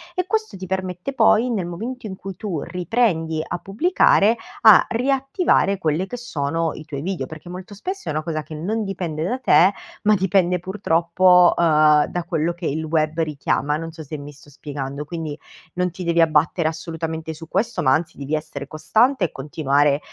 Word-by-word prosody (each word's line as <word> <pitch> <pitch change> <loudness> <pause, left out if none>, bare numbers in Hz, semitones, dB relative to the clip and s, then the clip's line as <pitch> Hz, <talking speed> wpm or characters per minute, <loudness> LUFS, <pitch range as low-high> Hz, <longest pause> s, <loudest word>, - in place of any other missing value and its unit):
e 365 - 0
questo 435 +2 -1
ti 185 - -7
permette 185 +4 -3
poi, 230 0 +4
nel 200 -6 -1
momento 230 +9 -6
in 190 - -6
cui 195 0 -8
tu 180 -9 -4
riprendi 175 -4 0
a 175 - -3
pubblicare, 215 - +3 0.3
a 220 -3 +8
riattivare 270 - +1
quelle 160 0 0
che 245 - -6
sono 165 -7 -2
i 155 - -10
tuoi 145 -3 -6
video, 175 -4 -3
perché 160 +5 -11
molto 185 +3 -8
spesso 375 - -6
è - - 0
una 155 +1 -2
cosa 155 -1 -3
che 155 - -9
non 210 +9 -2
dipende 175 -5 -3
da 245 +8 -1
te, 195 -6 +5 0.3
ma 215 0 +4
dipende, 185 -2 +2
purtroppo, 180 0 +3
uhm, 155 -2 +5
da 175 - -3
quello 165 +1 0
che 175 0 -8
il 155 +3 -2
web 155 0 0
richiama, 150 -1 -1
non 165 +1 -6
so 160 0 -9
se 155 +1 -7
mi 145 0 -9
sto 145 +1 -18
spiegando. 140 0 -6
Quindi, 160 -2 -5 0.4
non 180 0 0
ti 180 +2 -7
devi 170 0 +1
abbattere 160 +1 +2
assolutamente 160 0 -4
su 160 +1 -11
questo, 200 +2 -1
ma 130 - +3
anzi 160 +3 -1
devi 140 +2 -2
essere 150 -3 -6
costante 225 - +2
e 165 - -5
continuare, 145 0 +1
170 Hz, 190 wpm, -21 LUFS, 155-195 Hz, 0.4 s, a